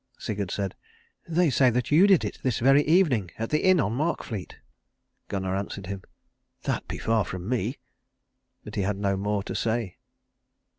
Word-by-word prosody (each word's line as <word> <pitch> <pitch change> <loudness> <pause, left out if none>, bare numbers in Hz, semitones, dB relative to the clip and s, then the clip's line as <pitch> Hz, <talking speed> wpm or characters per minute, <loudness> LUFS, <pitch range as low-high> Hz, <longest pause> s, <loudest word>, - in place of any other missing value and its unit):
Sigurd 100 -4 -3
said, 100 -1 -2 0.5
"They 170 -1 +2
say 130 +1 +5
that 125 +2 -1
you 170 +7 +7
did 190 -4 +5
it - - -5
this 130 -4 0
very 135 +4 +5
evening 150 - +3
at 115 0 -4
the 150 - +1
inn 185 -2 +5
on 115 -6 +1
Markfleet." 120 - -3 0.7
Gunnar 95 -1 -2
answered 100 0 -4
him, 95 +1 -5 0.6
"That - - -2
be - - -4
far 110 -1 +1
from 90 0 -6
me." 125 +1 -1 0.9
But 105 - -9
he 100 - -1
had 95 +1 -1
no 100 -1 0
more 100 +1 -1
to - - -5
say. 115 -4 -1
110 Hz, 170 wpm, -26 LUFS, 100-135 Hz, 0.9 s, you